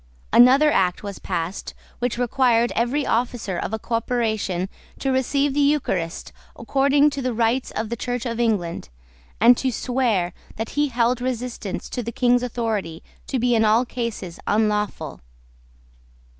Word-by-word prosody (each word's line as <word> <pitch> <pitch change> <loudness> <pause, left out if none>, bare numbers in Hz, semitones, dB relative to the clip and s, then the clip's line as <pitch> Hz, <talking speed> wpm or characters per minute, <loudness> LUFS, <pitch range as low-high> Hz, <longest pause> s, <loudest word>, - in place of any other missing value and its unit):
Another 270 +5 +7
act 185 -4 +1
was 200 -2 -6
passed 175 0 -4 0.2
which 245 -1 -1
required 240 -1 +2
every 255 +5 0
officer 225 -6 -1
of - - -3
a 220 - -1
corporation 220 -5 -1 0.3
to 270 - -1
receive 275 +2 +1
the 290 - 0
Eucharist 280 - 0 0.2
according 280 +4 +3
to 280 - -4
the 250 -2 -2
rites 235 +3 +1
of 220 0 -4
the 235 - -2
Church 245 +1 -3
of 235 -1 -3
England, 200 - -1 0.5
and 235 +3 +7
to 260 - 0
swear 230 -8 0 0.2
that 225 +1 -4
he 295 0 +1
held 245 -1 +1
resistance 250 -5 -4
to 245 - -3
the 235 0 -5
King's 245 +1 +2
authority 225 -9 -3 0.2
to 265 - -1
be 245 0 +2
in 225 -1 +3
all 220 +3 +4
cases 230 -8 -5
unlawful. 210 -8 0
235 Hz, 150 wpm, -23 LUFS, 210-255 Hz, 0.5 s, Another